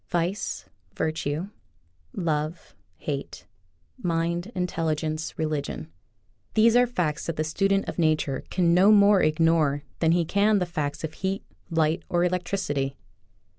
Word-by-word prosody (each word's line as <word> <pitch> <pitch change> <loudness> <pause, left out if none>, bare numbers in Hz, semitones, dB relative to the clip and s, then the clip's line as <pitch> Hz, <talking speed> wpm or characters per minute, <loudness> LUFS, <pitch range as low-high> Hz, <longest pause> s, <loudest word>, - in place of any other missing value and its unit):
Vice, 175 +3 -2 0.3
virtue, 155 +3 -2 0.6
love, 155 -2 -2 0.2
hate, - - -5 0.6
mind, 170 +3 -1
intelli 165 -3 0
gence, 155 +1 -4
religion 150 - -3 0.3
— 100 0 -41
these 225 +1 +5
are 245 0 +5
facts 170 -10 -2
that 165 - -2
the 155 - 0
student 195 +5 +1
of - - -5
nature 155 -4 +1
can 170 -2 +2
no 185 +4 +6
more 205 -1 +6
ignore 155 -2 +2 0.2
than 165 -1 +3
he 170 0 +2
can 205 +5 +3
the 180 - +1
facts 150 -4 -3
of 160 -1 -4
heat, 190 +3 -3 0.3
light, 160 +1 +1
or 175 0 +2
electricity. 175 -6 -1
165 Hz, 135 wpm, -26 LUFS, 155-185 Hz, 0.6 s, no